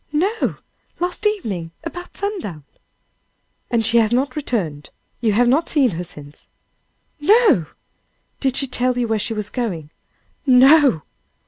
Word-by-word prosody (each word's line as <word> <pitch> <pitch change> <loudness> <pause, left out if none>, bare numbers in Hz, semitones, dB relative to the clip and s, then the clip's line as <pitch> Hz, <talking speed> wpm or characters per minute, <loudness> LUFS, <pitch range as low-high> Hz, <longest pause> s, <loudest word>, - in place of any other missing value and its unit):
"No! 385 +9 0 0.4
last 360 +4 0
evening, 210 - -3
about 355 +2 -7
sundown." 360 - -4 1.1
"And 230 -2 +1
she 230 +2 +2
has 225 -1 +3
not 255 +2 0
returned? 185 - -3 0.3
You 220 -3 +1
have 240 +4 +3
not 290 +7 +2
seen 275 -7 +3
her 175 +1 -4
since?" 150 -4 -12 0.7
"No!" 365 - +4 0.7
"Did 265 -2 0
she 275 - +1
tell 250 -1 0
you 245 -1 0
where 220 -1 0
she 225 +2 -3
was 210 -1 -4
going?" 175 - -4 0.5
"No!" 265 - +5
245 Hz, 135 wpm, -20 LUFS, 205-300 Hz, 1.1 s, No